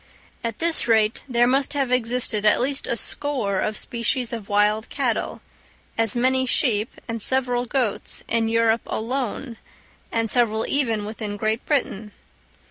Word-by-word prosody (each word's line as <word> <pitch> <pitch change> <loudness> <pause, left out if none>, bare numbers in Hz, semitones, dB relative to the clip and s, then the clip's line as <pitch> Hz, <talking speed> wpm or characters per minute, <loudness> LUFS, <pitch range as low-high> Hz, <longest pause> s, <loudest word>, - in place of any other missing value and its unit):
At 230 -2 -3
this 330 -6 +1
rate 220 -1 +3
there 240 -1 +3
must 270 +3 +2
have 275 -3 -1
existed 240 -3 +2
at 210 - +4
least 275 +3 -1
a 235 - -1
score 235 -12 -1
of 215 +2 -1
species 240 +1 -2
of 220 -4 -6
wild 210 +2 +2
cattle, - - -2 0.5
as 225 -1 0
many 260 +2 +2
sheep, 225 -4 +1
and 230 -1 -4
several 250 0 +2
goats, 240 -5 -2
in 225 -1 +1
Europe 230 0 +2
alone, 245 0 -3 0.5
and 225 0 0
several 225 -2 +2
even 230 -7 0
within 210 -1 -5
Great 220 +2 -1
Britain. 215 -8 -1
230 Hz, 145 wpm, -23 LUFS, 215-255 Hz, 0.5 s, at